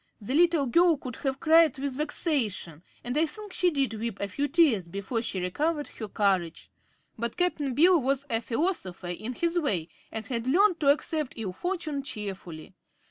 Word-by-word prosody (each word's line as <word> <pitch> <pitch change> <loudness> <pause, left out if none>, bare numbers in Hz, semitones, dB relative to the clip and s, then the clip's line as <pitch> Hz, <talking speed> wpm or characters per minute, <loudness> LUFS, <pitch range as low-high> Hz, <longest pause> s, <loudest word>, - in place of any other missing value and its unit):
The 220 +4 -4
little 335 -2 +4
girl 335 +5 +4
could 255 -3 -8
have 270 -1 -2
cried 320 -3 +5
with 275 -1 -2
vexation, 265 - -1 0.2
and 245 +2 -3
I 320 +2 +3
think 415 +5 -8
she 360 - +3
did 275 -7 0
weep 220 -1 -4
a 200 - -2
few 280 +9 -2
tears 275 - +3
before 200 +6 -3
she 195 -4 -2
recovered 295 - -1
her 220 - -7
courage; 190 -5 -1 0.5
but 235 0 -3
Cap'n 300 -7 0
Bill 340 +2 +5
was 270 +2 0
a 225 -3 0
philosopher, 230 - -2
in 215 +8 -4
his 340 +6 0
way, 185 - -1 0.2
and 220 -1 -5
had 235 +1 -3
learned 360 +5 +4
to 280 - +3
accept 305 -1 -2
ill 205 -5 -4
fortune 335 - -3
cheerfully. 195 - -6
265 Hz, 180 wpm, -27 LUFS, 210-320 Hz, 0.5 s, cried